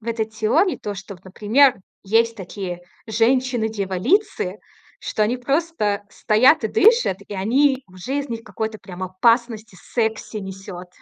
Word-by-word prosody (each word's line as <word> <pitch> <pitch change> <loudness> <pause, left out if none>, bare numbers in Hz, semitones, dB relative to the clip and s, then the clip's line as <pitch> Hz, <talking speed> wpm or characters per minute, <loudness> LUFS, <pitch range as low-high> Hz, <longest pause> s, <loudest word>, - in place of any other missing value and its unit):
в 230 - -8
этой 225 -1 0
теории 220 - +1
то, 205 - -4
что, 195 +1 -9
вот, 175 - -20
например, 225 +8 +3 0.3
есть 225 +3 +2
такие 185 -2 -6 0.3
женщины-дьяволицы, 220 - 0 0.4
что 215 - -2
они 235 +4 +1
просто 250 -6 -1
стоят 230 +5 +3
и - - +1
дышат, 440 - +4
и 205 - -6
они 260 +7 +2
уже 185 +10 -5
из 285 - -4
них 230 -1 -5
какой-то 220 -2 -5
прям 185 -1 -7
опасность 225 +3 +1
и - - -15
секси 220 0 -3
несёт. 190 -2 -8
220 Hz, 145 wpm, -21 LUFS, 195-250 Hz, 0.4 s, дышат